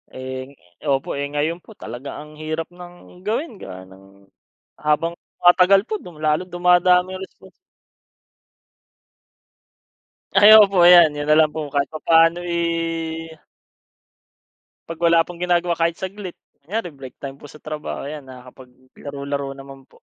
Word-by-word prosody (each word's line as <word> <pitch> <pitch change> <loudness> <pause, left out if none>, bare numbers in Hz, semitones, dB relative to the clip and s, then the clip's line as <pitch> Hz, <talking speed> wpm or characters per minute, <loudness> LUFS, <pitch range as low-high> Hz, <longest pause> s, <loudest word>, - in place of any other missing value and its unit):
Eh, 130 +1 -7 0.3
opo, 135 -1 0
eh, 140 0 -3
ngayon 155 +4 -2
po 220 - -17
talaga 120 +5 -8
ang 150 +1 -11
hirap 155 +1 -4
ng 175 0 -14
gawin 220 - -4
gawa 95 0 -9
ng 95 +1 -19 0.5
habang 150 +3 0 0.2
tumatagal 180 +2 +6
po 215 - -2
du 180 -4 -11
lalo 155 +3 +1
dumadami 180 +1 +2
responsi 190 0 -12 2.9
Ay 210 +1 +9
opo 200 -2 +2
'yan. 175 -3 +8
'Yun 145 - -3
nalang 155 0 +5
po 160 - -4
kahit 140 0 0
papaano, 165 +2 +3
eh. 165 -1 -3 1.5
'Pag 165 +1 -3
wala 170 0 +5
pong 175 +1 -7
ginagawa 175 -1 0
kahit 165 +1 -1
saglit, 190 -1 -6 0.3
kunyari 210 +1 -3
break 135 -4 -12
time 140 0 -7
po - - -15
sa 150 +1 -14
trabaho 150 -2 -6
ayan, 150 -2 -8
nakakapaglaro-laro 130 +2 -8
naman 135 0 -13
po, - - -25
160 Hz, 130 wpm, -21 LUFS, 140-175 Hz, 2.9 s, Ay